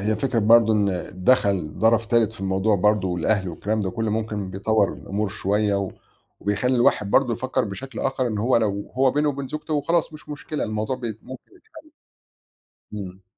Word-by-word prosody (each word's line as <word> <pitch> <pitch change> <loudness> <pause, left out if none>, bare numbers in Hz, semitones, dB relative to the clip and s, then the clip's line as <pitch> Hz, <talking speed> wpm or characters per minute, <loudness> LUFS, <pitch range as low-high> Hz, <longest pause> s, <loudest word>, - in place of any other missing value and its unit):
هي 105 +2 0
فكرة 125 +1 -1
برضه 115 +1 +5
إن 100 -4 0
دَخَل 100 -11 +2
طَرَف 115 0 +3
تالت 115 -2 +2
في 115 - -14
الموضوع 95 +2 +1
برضه 105 0 +2
والأهل 90 +3 0
والكلام 105 +6 -2
ده 95 -2 -1
كُلّه 115 -2 -2
ممكن 105 -3 -3
بيطوّر 100 +2 +1
الأمور 105 +1 -3
شوية 105 +1 0
و 100 -1 -1 0.5
وبيخلّي 105 +6 0
الواحد 105 -4 +2
برضه 125 -3 +3
يفكّر 130 +1 -1
بشكل 130 +7 -7
آخَر 135 -1 0
إن 110 -3 -2
هو 120 +4 +2
لو 100 -3 -1
هو 130 0 +4
بينه 150 +2 +1
وبين 140 -2 -3
زوجته 155 -1 -2
خلاص 165 +1 0
مش 150 - -13
مشكلة، 150 +1 -4
الموضوع 110 +4 -2
بت 115 -4 -5
ممكن 130 - -11
يتحَل. 440 +5 -27 1.2
إمم. 95 -2 -7
110 Hz, 180 wpm, -23 LUFS, 100-130 Hz, 1.2 s, برضه